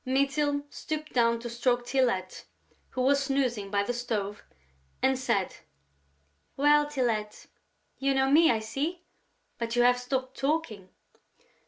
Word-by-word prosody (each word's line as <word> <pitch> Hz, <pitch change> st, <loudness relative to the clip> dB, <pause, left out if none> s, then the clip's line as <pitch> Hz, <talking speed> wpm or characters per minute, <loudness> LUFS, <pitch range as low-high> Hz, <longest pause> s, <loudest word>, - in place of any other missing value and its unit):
Mytyl 280 Hz, +2 st, +1 dB
stooped 305 Hz, 0 st, -5 dB
down 235 Hz, -1 st, +3 dB
to 240 Hz, -, -5 dB
stroke 240 Hz, +1 st, 0 dB
Tylette, 240 Hz, -8 st, 0 dB, 0.4 s
who 255 Hz, -, -3 dB
was 280 Hz, +1 st, +3 dB
snoozing 250 Hz, -7 st, -1 dB
by 200 Hz, 0 st, +1 dB
the 245 Hz, -, -2 dB
stove, 215 Hz, -4 st, -3 dB, 0.6 s
and 265 Hz, 0 st, +2 dB
said: 235 Hz, -7 st, -1 dB, 1.0 s
"Well, 295 Hz, +1 st, +4 dB
Tylette?... 230 Hz, -7 st, -2 dB, 0.5 s
You 275 Hz, 0 st, +1 dB
know 265 Hz, 0 st, +2 dB
me, 320 Hz, +3 st, +6 dB
I 225 Hz, -2 st, +2 dB
see, 305 Hz, +10 st, -3 dB, 0.6 s
but 235 Hz, 0 st, -2 dB
you 240 Hz, -, +4 dB
have 245 Hz, 0 st, +4 dB
stopped 260 Hz, +1 st, -3 dB
talking." 270 Hz, -, -2 dB
255 Hz, 135 wpm, -28 LUFS, 230-280 Hz, 1.0 s, me